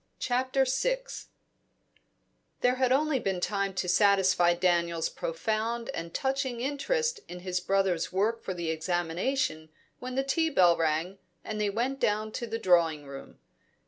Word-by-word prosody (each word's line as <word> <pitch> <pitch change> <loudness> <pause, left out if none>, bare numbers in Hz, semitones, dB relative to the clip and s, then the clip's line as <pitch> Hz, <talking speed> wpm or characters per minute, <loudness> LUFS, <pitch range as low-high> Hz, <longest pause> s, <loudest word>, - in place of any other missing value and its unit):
CHAPTER 260 +2 +1
VI - - 0 1.6
There 250 0 +4
had 255 -1 +2
only 290 +1 +2
been 190 -5 -2
time 195 +1 -1
to 180 - -2
satisfy 185 -2 +4
Daniel's 170 -2 +1
profound 220 +7 -2
and 165 0 -5
touching 265 0 -1
interest 465 - -1
in 180 0 -8
his 180 0 -2
brother's 190 -2 0
work 215 +5 0
for 185 - -5
the 170 -2 -2
examination 165 - -1 0.3
when 255 0 -6
the 270 - +1
tea 320 +4 +1
bell 180 - +5
rang, 165 +4 -1 0.2
and 215 -1 -4
they 210 - +1
went 245 +6 -2
down 215 -1 0
to 235 - -4
the 225 0 -3
drawing 170 -7 +2
room. 140 0 -10
200 Hz, 145 wpm, -28 LUFS, 175-255 Hz, 1.6 s, bell